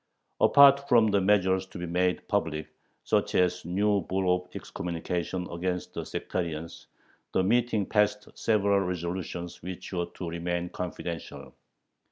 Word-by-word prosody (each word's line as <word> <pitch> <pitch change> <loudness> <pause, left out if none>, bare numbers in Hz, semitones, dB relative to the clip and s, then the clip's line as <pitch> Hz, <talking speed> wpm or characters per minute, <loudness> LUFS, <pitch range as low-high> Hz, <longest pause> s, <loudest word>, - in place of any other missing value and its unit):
Apart 140 0 +6
from 115 -4 +5
the 100 -1 +3
measures 95 -1 +2
to 95 - -10
be 90 - -4
made 90 +1 0
public, 80 -6 -1 0.3
such - - +1
as 90 0 +2
a - - -10
new 100 +3 +2
bull 95 +1 +1
of 90 0 -8
excommunication 90 +1 -3
against 90 +1 -3
the - - -4
sectarians, 85 -2 -4 0.5
the 95 - +2
meeting 110 0 +2
passed 105 0 +1
several 100 -2 +2
resolutions 90 -1 -4
which 90 +2 -7
were 85 -1 -1
to 90 - -7
remain 85 +1 -2
confidential. 85 -2 -6
90 Hz, 140 wpm, -28 LUFS, 85-100 Hz, 0.5 s, Apart